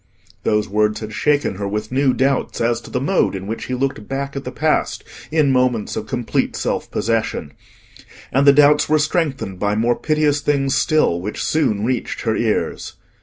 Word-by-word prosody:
Those 105 Hz, 0 st, +1 dB
words 105 Hz, +1 st, +1 dB
had 110 Hz, 0 st, -6 dB
shaken 145 Hz, -5 st, +1 dB
her 100 Hz, 0 st, -3 dB
with 105 Hz, +2 st, -4 dB
new 135 Hz, +1 st, +3 dB
doubts 135 Hz, +1 st, 0 dB
as 120 Hz, 0 st, +1 dB
to -, -, -12 dB
the 125 Hz, -, -1 dB
mode 140 Hz, -, +1 dB
in 95 Hz, 0 st, -6 dB
which 110 Hz, +3 st, -4 dB
he 125 Hz, -, -3 dB
looked 130 Hz, -5 st, -2 dB
back 140 Hz, +1 st, -4 dB
at 140 Hz, -, -5 dB
the 125 Hz, -, -4 dB
past 155 Hz, +2 st, 0 dB, 0.3 s
in 155 Hz, -3 st, +2 dB
moments 125 Hz, -4 st, +1 dB
of 110 Hz, -, -4 dB
complete 120 Hz, -2 st, -1 dB
self -, -, -2 dB
possession. 110 Hz, -9 st, -1 dB, 0.8 s
And 135 Hz, +3 st, +2 dB
the -, -, +10 dB
doubts 150 Hz, +1 st, +4 dB
were 155 Hz, -, +4 dB
strengthened 150 Hz, -, -1 dB
by 105 Hz, 0 st, 0 dB
more 115 Hz, +2 st, +2 dB
piteous 150 Hz, 0 st, +1 dB
things 140 Hz, -2 st, +1 dB
still, 150 Hz, -, +2 dB
which 105 Hz, +4 st, -4 dB
soon 110 Hz, -10 st, +1 dB
reached 125 Hz, 0 st, -2 dB
her -, -, 0 dB
ears. -, -, -1 dB
130 Hz, 185 wpm, -20 LUFS, 105-145 Hz, 0.8 s, the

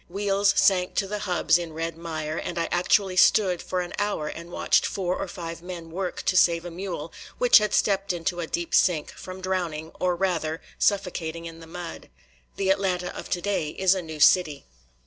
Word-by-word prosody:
Wheels 200 Hz, +1 st, +2 dB
sank 190 Hz, -2 st, +3 dB
to 200 Hz, -, +1 dB
the 210 Hz, +2 st, -4 dB
hubs 180 Hz, -3 st, +2 dB
in 170 Hz, -2 st, -6 dB
red 165 Hz, +1 st, -3 dB
mire, 160 Hz, -2 st, -4 dB
and 175 Hz, -, -4 dB
I 165 Hz, -, 0 dB
actually 185 Hz, +1 st, +2 dB
stood 185 Hz, -3 st, +4 dB
for 185 Hz, -1 st, -2 dB
an 175 Hz, -, -6 dB
hour 205 Hz, -7 st, -1 dB
and 170 Hz, +2 st, -7 dB
watched -, -, +2 dB
four 185 Hz, -2 st, -1 dB
or 195 Hz, -, -4 dB
five 170 Hz, -2 st, -7 dB
men 175 Hz, -2 st, -8 dB
work 185 Hz, +1 st, -4 dB
to 185 Hz, -, +1 dB
save 170 Hz, -1 st, +4 dB
a 175 Hz, -, -6 dB
mule, 170 Hz, -3 st, -6 dB, 0.2 s
which 245 Hz, -2 st, +7 dB
had 210 Hz, -1 st, -1 dB
stepped 195 Hz, -1 st, +1 dB
into 175 Hz, +1 st, -2 dB
a 165 Hz, -, -3 dB
deep 170 Hz, +1 st, -3 dB
sink, 165 Hz, -5 st, +3 dB
from 185 Hz, 0 st, -9 dB
drowning, 175 Hz, -4 st, -3 dB
or, 180 Hz, -1 st, +1 dB
rather, 165 Hz, -4 st, -1 dB, 0.2 s
suffocating 170 Hz, -5 st, 0 dB
in 165 Hz, 0 st, -8 dB
the 165 Hz, -, -12 dB
mud. 175 Hz, 0 st, -8 dB, 0.5 s
The 190 Hz, -1 st, +1 dB
Atlanta 185 Hz, -2 st, -1 dB
of -, -, -7 dB
today 180 Hz, -3 st, -1 dB
is 190 Hz, +4 st, +2 dB
a 190 Hz, -, -2 dB
new 160 Hz, -2 st, -8 dB
city. 150 Hz, -3 st, +4 dB
180 Hz, 195 wpm, -25 LUFS, 165-190 Hz, 0.5 s, which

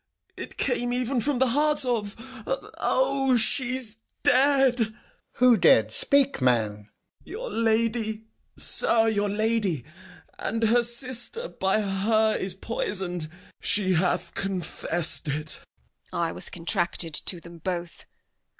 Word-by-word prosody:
It -, -, -8 dB
came 245 Hz, 0 st, 0 dB
even 250 Hz, 0 st, 0 dB
from 285 Hz, +2 st, 0 dB
the 260 Hz, 0 st, +2 dB
heart 295 Hz, +2 st, +2 dB
of 220 Hz, -5 st, -1 dB, 0.3 s
O! 275 Hz, -, 0 dB
she's 240 Hz, -1 st, +2 dB, 0.3 s
dead! 270 Hz, -1 st, +4 dB
Alb. 220 Hz, -1 st, 0 dB, 0.4 s
Who 250 Hz, -2 st, +5 dB
dead? 110 Hz, -, +4 dB
Speak, 280 Hz, -, +2 dB
man. 110 Hz, -5 st, +1 dB, 0.3 s
Gent. -, -, -20 dB
Your 460 Hz, +7 st, -6 dB
lady, 225 Hz, -1 st, 0 dB, 0.3 s
sir, 225 Hz, -1 st, +3 dB
your 205 Hz, -1 st, 0 dB
lady! 210 Hz, -, 0 dB, 0.5 s
and 225 Hz, +2 st, -2 dB
her 230 Hz, +2 st, +4 dB
sister 250 Hz, -, +1 dB
By 195 Hz, +3 st, 0 dB
her 215 Hz, +2 st, +1 dB
is 185 Hz, -1 st, -2 dB
poisoned; 190 Hz, -6 st, -3 dB, 0.3 s
she 200 Hz, -2 st, +1 dB
hath 175 Hz, 0 st, 0 dB
confess'd 175 Hz, -3 st, 0 dB
it. 150 Hz, +1 st, -1 dB, 0.5 s
Edm. -, -, -5 dB
I 170 Hz, -1 st, 0 dB
was -, -, -7 dB
contracted 170 Hz, -2 st, -3 dB
to 175 Hz, +3 st, -4 dB
them 170 Hz, 0 st, -13 dB
both. 175 Hz, 0 st, -5 dB
220 Hz, 125 wpm, -26 LUFS, 180-250 Hz, 0.5 s, Who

